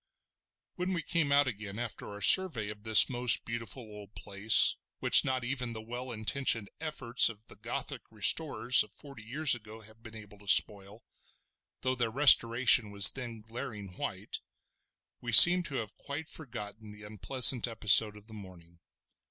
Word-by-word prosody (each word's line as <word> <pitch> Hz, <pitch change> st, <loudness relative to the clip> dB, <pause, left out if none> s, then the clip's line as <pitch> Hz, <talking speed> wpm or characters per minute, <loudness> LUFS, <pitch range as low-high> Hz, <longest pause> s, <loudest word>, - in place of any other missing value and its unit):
When 180 Hz, +1 st, -4 dB
we 165 Hz, -3 st, -5 dB
came 155 Hz, -3 st, -3 dB
out 145 Hz, 0 st, +2 dB
again 105 Hz, -4 st, -8 dB
after 120 Hz, -2 st, -9 dB
our 105 Hz, 0 st, -12 dB
survey 155 Hz, -, +2 dB
of 105 Hz, 0 st, -11 dB
this 110 Hz, -1 st, +5 dB
most 125 Hz, -2 st, 0 dB
beautiful 115 Hz, +2 st, -8 dB
old 105 Hz, -2 st, -15 dB
place 100 Hz, +2 st, +2 dB, 0.2 s
which -, -, +3 dB
not 130 Hz, -1 st, -4 dB
even 125 Hz, -1 st, -6 dB
the 110 Hz, -, -10 dB
well 120 Hz, +3 st, -9 dB
intentioned 115 Hz, -1 st, -2 dB
efforts 135 Hz, -8 st, -1 dB
of 110 Hz, -1 st, -14 dB
the -, -, -16 dB
Gothic 125 Hz, +5 st, -8 dB
restorers 125 Hz, -, +1 dB
of -, -, -19 dB
forty 140 Hz, -6 st, -16 dB
years 140 Hz, +7 st, 0 dB
ago 110 Hz, -1 st, -11 dB
have 110 Hz, +1 st, -20 dB
been 110 Hz, -1 st, -15 dB
able 105 Hz, -2 st, -15 dB
to 100 Hz, -, -20 dB
spoil—though 105 Hz, +5 st, -3 dB
their 120 Hz, -2 st, -3 dB
restoration 120 Hz, -3 st, +3 dB
was 100 Hz, -2 st, +6 dB
then 120 Hz, -4 st, -10 dB
glaring 110 Hz, -3 st, -10 dB
white—we 120 Hz, +5 st, -12 dB
seemed 175 Hz, +8 st, +8 dB
to 140 Hz, -, -8 dB
have 110 Hz, -4 st, -7 dB
quite 155 Hz, +3 st, -10 dB
forgotten 110 Hz, -7 st, -11 dB
the 105 Hz, +1 st, -14 dB
unpleasant 125 Hz, +4 st, +2 dB
episode 110 Hz, -1 st, +3 dB
of 105 Hz, -, -18 dB
the 110 Hz, -, -15 dB
morning. 90 Hz, -4 st, -16 dB
115 Hz, 160 wpm, -28 LUFS, 105-130 Hz, 0.2 s, seemed